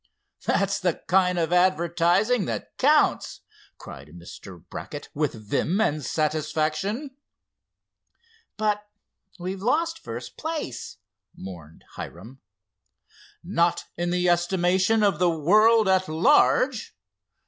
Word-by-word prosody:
"That's 200 Hz, 0 st, +1 dB
the 180 Hz, -4 st, 0 dB
kind 180 Hz, 0 st, +3 dB
of 170 Hz, 0 st, 0 dB
advertising 180 Hz, +5 st, +2 dB
that 115 Hz, -6 st, -5 dB
counts!" -, -, +2 dB, 0.4 s
cried 70 Hz, -, -11 dB
Mr. 85 Hz, +2 st, -12 dB
Brackett, 145 Hz, -, -8 dB
with 150 Hz, 0 st, -1 dB
vim 110 Hz, -, -1 dB
and 155 Hz, -9 st, 0 dB
satisfaction. 155 Hz, -, -2 dB, 1.4 s
"But 210 Hz, -1 st, -1 dB, 0.5 s
we've 185 Hz, +1 st, -5 dB
lost 325 Hz, +9 st, 0 dB
first -, -, -8 dB
place!" 310 Hz, -, -5 dB, 0.4 s
mourned 85 Hz, -4 st, -11 dB
Hiram. 115 Hz, +10 st, -9 dB, 1.0 s
"Not 170 Hz, -1 st, 0 dB
in 175 Hz, +1 st, -2 dB
the 180 Hz, 0 st, 0 dB
estimation 185 Hz, +4 st, +2 dB
of 195 Hz, -6 st, +2 dB
the 180 Hz, -1 st, +3 dB
world 210 Hz, +7 st, +4 dB
at 190 Hz, 0 st, +2 dB
large. 250 Hz, -, +2 dB
180 Hz, 105 wpm, -25 LUFS, 155-210 Hz, 1.4 s, world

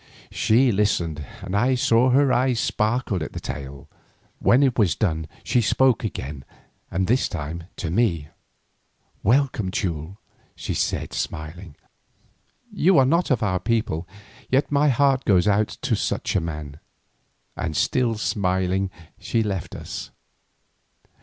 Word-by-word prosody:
She 120 Hz, +3 st, +3 dB
listened 85 Hz, -7 st, 0 dB, 0.2 s
and 95 Hz, -, -4 dB
I 125 Hz, +5 st, +3 dB
saw 120 Hz, 0 st, +3 dB
that 125 Hz, -, +3 dB
her 140 Hz, -2 st, +4 dB
eyes 125 Hz, -2 st, +2 dB
sparkled 110 Hz, -4 st, 0 dB
at 75 Hz, -, -5 dB
the -, -, -5 dB
tale. 70 Hz, -1 st, -7 dB, 0.5 s
When 130 Hz, +4 st, +4 dB
it 130 Hz, -3 st, +2 dB
was 95 Hz, -8 st, +3 dB
done 80 Hz, -7 st, -1 dB, 0.2 s
she 125 Hz, -, +2 dB
spoke 125 Hz, +2 st, +3 dB
again, 70 Hz, -, -5 dB, 0.5 s
and 95 Hz, +1 st, 0 dB
this 125 Hz, +7 st, +2 dB
time 80 Hz, +1 st, -5 dB
to 80 Hz, -, -4 dB
me. 85 Hz, -8 st, +1 dB, 0.9 s
"Welcome, 120 Hz, -4 st, +2 dB
Teule," 90 Hz, -1 st, -3 dB, 0.4 s
she -, -, -4 dB
said -, -, -2 dB
smiling. 80 Hz, +1 st, -5 dB, 1.0 s
"You 185 Hz, -2 st, +4 dB
are 135 Hz, -, +6 dB
not 170 Hz, +6 st, +2 dB
of 125 Hz, -5 st, +1 dB
our 90 Hz, -3 st, +1 dB
people, 110 Hz, -7 st, -1 dB, 0.4 s
yet 135 Hz, +3 st, +1 dB
my 145 Hz, +1 st, +4 dB
heart 135 Hz, 0 st, +3 dB
goes 95 Hz, -2 st, +3 dB
out 105 Hz, +1 st, +3 dB, 0.2 s
to -, -, +1 dB
such -, -, -2 dB
a 95 Hz, -, +3 dB
man." 75 Hz, -3 st, -6 dB, 0.8 s
And 80 Hz, -2 st, -3 dB
still 120 Hz, -3 st, +1 dB
smiling 95 Hz, -2 st, 0 dB, 0.3 s
she 115 Hz, -1 st, 0 dB
left 95 Hz, -5 st, -4 dB
us. -, -, -7 dB
105 Hz, 140 wpm, -23 LUFS, 85-125 Hz, 1.0 s, are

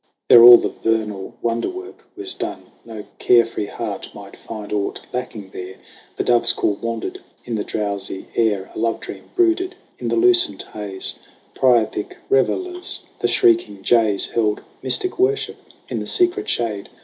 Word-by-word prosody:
There 120 Hz, -, +9 dB
all 120 Hz, 0 st, +11 dB
the -, -, -2 dB
vernal 105 Hz, -3 st, -2 dB
wonder 115 Hz, 0 st, -1 dB
work 375 Hz, +1 st, -10 dB
was 380 Hz, 0 st, -4 dB
done: 350 Hz, -3 st, -7 dB
No 110 Hz, -2 st, -9 dB
care 120 Hz, -1 st, +5 dB
free 110 Hz, -2 st, -5 dB
heart -, -, -6 dB
might -, -, -11 dB
find 105 Hz, -2 st, -8 dB
aught 100 Hz, -1 st, -2 dB
lacking 110 Hz, -6 st, -6 dB
there. 90 Hz, +1 st, -8 dB, 0.4 s
The -, -, 0 dB
dove's 120 Hz, -1 st, +3 dB
call 105 Hz, -, 0 dB
wandered 115 Hz, -1 st, -4 dB, 0.3 s
in 120 Hz, -, -5 dB
the 105 Hz, -2 st, -1 dB
drowsy 100 Hz, -2 st, -4 dB
air; 105 Hz, -4 st, 0 dB
A -, -, -7 dB
love 115 Hz, 0 st, 0 dB
dream -, -, -10 dB
brooded 365 Hz, +1 st, +1 dB, 0.2 s
in -, -, -4 dB
the -, -, 0 dB
lucent 360 Hz, -1 st, +5 dB
haze. 100 Hz, -3 st, -3 dB, 0.3 s
Priapic 120 Hz, -5 st, +1 dB, 0.2 s
revellers, 360 Hz, -, 0 dB, 0.2 s
the -, -, +1 dB
shrieking 340 Hz, -, +2 dB
jays 110 Hz, -3 st, +2 dB
Held 105 Hz, -2 st, 0 dB, 0.2 s
mystic 335 Hz, -, 0 dB
worship 415 Hz, +2 st, 0 dB, 0.3 s
in -, -, -4 dB
the -, -, -5 dB
secret 365 Hz, +3 st, +2 dB
shade. 105 Hz, -4 st, -2 dB
115 Hz, 160 wpm, -20 LUFS, -, 0.4 s, all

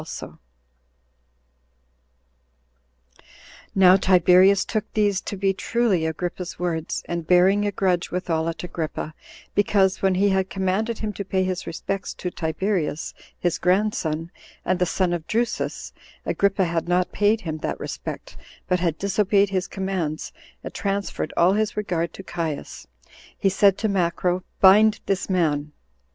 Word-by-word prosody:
Now 190 Hz, -1 st, +7 dB
Tiberius 185 Hz, +1 st, +5 dB
took 215 Hz, -2 st, -3 dB
these 205 Hz, -3 st, +2 dB
to 200 Hz, -, -6 dB
be 195 Hz, 0 st, +1 dB
truly 195 Hz, -4 st, 0 dB
Agrippa's 175 Hz, +2 st, -4 dB
words, 165 Hz, -3 st, -2 dB
and 170 Hz, -2 st, -4 dB
bearing 190 Hz, +3 st, +4 dB
a -, -, 0 dB
grudge 185 Hz, -3 st, 0 dB
withal 165 Hz, -2 st, -1 dB
at 165 Hz, -, -6 dB
Agrippa, 160 Hz, -3 st, -4 dB, 0.4 s
because, 195 Hz, -2 st, +2 dB
when 190 Hz, -1 st, +2 dB
he 200 Hz, +2 st, +3 dB
had 190 Hz, -1 st, +1 dB
commanded 195 Hz, +4 st, -1 dB
him 215 Hz, -1 st, -4 dB
to 200 Hz, -, -5 dB
pay 190 Hz, -1 st, 0 dB
his 185 Hz, 0 st, -3 dB
respects 195 Hz, +4 st, -4 dB
to 180 Hz, -, -4 dB
Tiberius, 160 Hz, -1 st, -2 dB, 0.2 s
his 175 Hz, -1 st, -1 dB
grandson, 180 Hz, -4 st, 0 dB, 0.3 s
and 185 Hz, 0 st, +1 dB
the 180 Hz, -, +2 dB
son 180 Hz, 0 st, 0 dB
of 165 Hz, -2 st, -4 dB
Drusus, 235 Hz, +2 st, -2 dB, 0.3 s
Agrippa 200 Hz, -1 st, +1 dB
had 170 Hz, -1 st, -2 dB
not 180 Hz, +1 st, +1 dB
paid 210 Hz, +2 st, +2 dB
him 155 Hz, -5 st, -4 dB
that -, -, -3 dB
respect, -, -, -7 dB, 0.3 s
but 180 Hz, -, +1 dB
had 170 Hz, -3 st, 0 dB
disobeyed 200 Hz, 0 st, +2 dB
his 185 Hz, -1 st, -1 dB
commands, 190 Hz, -6 st, -3 dB, 0.3 s
and -, -, -7 dB
transferred 200 Hz, -5 st, -2 dB
all 175 Hz, +3 st, +5 dB
his 215 Hz, +1 st, -1 dB
regard 170 Hz, -5 st, -1 dB
to 195 Hz, -, -9 dB
Caius; 165 Hz, -, -5 dB, 0.5 s
he 195 Hz, -, +2 dB
said 195 Hz, 0 st, +4 dB
to 220 Hz, -, 0 dB
Macro, 180 Hz, -1 st, 0 dB, 0.2 s
"Bind 210 Hz, +3 st, +6 dB
this 195 Hz, 0 st, -1 dB
man." 150 Hz, -5 st, 0 dB
185 Hz, 140 wpm, -23 LUFS, 170-200 Hz, 0.5 s, Now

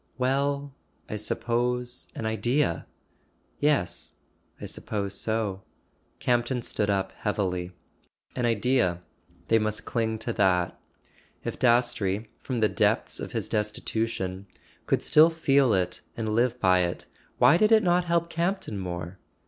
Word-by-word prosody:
"Well—I 140 Hz, -1 st, -2 dB
suppose, 120 Hz, +3 st, -1 dB
an 115 Hz, -, -4 dB
Idea." 110 Hz, -, 0 dB, 0.7 s
"Yes. 145 Hz, -11 st, 0 dB, 0.4 s
I -, -, -6 dB
suppose 100 Hz, -2 st, -4 dB
so." 105 Hz, -2 st, -1 dB, 0.6 s
Campton 120 Hz, 0 st, 0 dB
stood 105 Hz, -2 st, -1 dB
up 95 Hz, -1 st, 0 dB
heavily. 90 Hz, -4 st, -2 dB, 0.6 s
An 125 Hz, -2 st, +1 dB
Idea: 115 Hz, -6 st, +1 dB, 0.5 s
they 115 Hz, -, +5 dB
must 110 Hz, 0 st, -2 dB
cling 110 Hz, -2 st, -1 dB
to 115 Hz, +1 st, -3 dB
that. 90 Hz, -4 st, +2 dB, 0.7 s
If -, -, -4 dB
Dastrey, 120 Hz, -4 st, +2 dB
from 125 Hz, -4 st, -3 dB
the 110 Hz, -, +5 dB, 0.2 s
depths -, -, +1 dB
of -, -, -6 dB
his -, -, -2 dB
destitution, 105 Hz, -2 st, -2 dB, 0.4 s
could -, -, +1 dB
still 155 Hz, +2 st, +6 dB
feel 140 Hz, -6 st, +3 dB
it 90 Hz, -2 st, 0 dB, 0.2 s
and 110 Hz, -1 st, -2 dB
live 120 Hz, +2 st, +1 dB
by 95 Hz, -4 st, +4 dB
it, 90 Hz, -1 st, -1 dB, 0.3 s
why 170 Hz, -, +6 dB
did 215 Hz, +3 st, +3 dB
it 220 Hz, -1 st, +6 dB
not 175 Hz, 0 st, +3 dB
help 170 Hz, 0 st, +1 dB
Campton 170 Hz, -, -2 dB
more? 90 Hz, 0 st, -5 dB
115 Hz, 130 wpm, -27 LUFS, 100-130 Hz, 0.7 s, still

